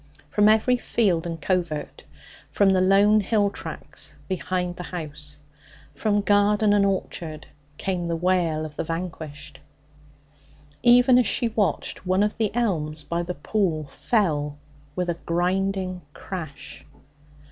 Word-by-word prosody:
From 210 +4 +5
every 220 +3 +4
field 185 -8 +1
and 165 -1 -5
covert, 170 -3 -2 0.4
from 200 -1 +3
the 185 -1 +3
lone 200 +3 +5
hill 205 0 +1
tracts - - -5
behind 180 -1 -2
the - - -7
house, 150 -4 -6 0.5
from 205 -2 +1
garden 205 +1 +3
and 205 -1 +4
orchard, 170 -5 -2 0.3
came 180 -3 -2
the 170 - -1
wail 170 -3 +1
of 150 -1 -9
the - - -1
vanquished. 155 -4 -6 1.2
Even 245 +1 +6
as 245 - +2
she 235 - +1
watched, 215 -3 -1
one 185 +2 +2
of 210 - 0
the 220 -2 +1
elms 155 -10 -1
by 170 +4 -2
the 175 +1 -4
pool 160 -1 -1
fell 150 - 0 0.4
with 180 -1 -1
a 170 -1 -2
grinding 185 +1 0
crash. 160 -7 -8
185 Hz, 135 wpm, -24 LUFS, 160-205 Hz, 1.2 s, Even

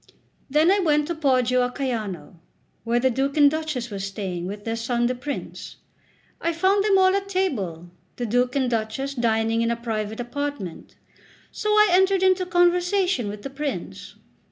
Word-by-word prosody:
Then 305 +6 +4
I 400 - +3
went 300 -5 +2
to - - 0
Poggio 255 -5 +2
a 245 - +1
Caiano, 215 - -4 0.5
where 235 +1 +1
the 260 +1 +2
Duke 275 +4 -1
and 290 -1 +6
Duchess 305 -7 -3
were 200 - -5
staying, 190 -3 -4
with 205 +1 -7
their 225 0 -2
son 235 +1 -1
the 250 - +1
Prince. 275 +3 -6 0.7
I 335 0 0
found 380 +4 +2
them 405 -2 +4
all 375 0 +4
at 395 0 -2
table, 195 - -2 0.2
the 245 - -3
Duke 245 +3 +1
and 265 -2 +1
Duchess 235 +4 -2
dining 225 -2 +1
in 230 - +1
a 235 - +1
private 220 -2 -4
apartment; 245 - -5 0.6
so 425 - -3
I 425 -1 +5
entered 380 +1 +3
into 370 -1 +3
conversation 355 - +2
with 205 0 -7
the 275 - -6
Prince. 285 0 -5
260 Hz, 175 wpm, -24 LUFS, 225-340 Hz, 0.7 s, and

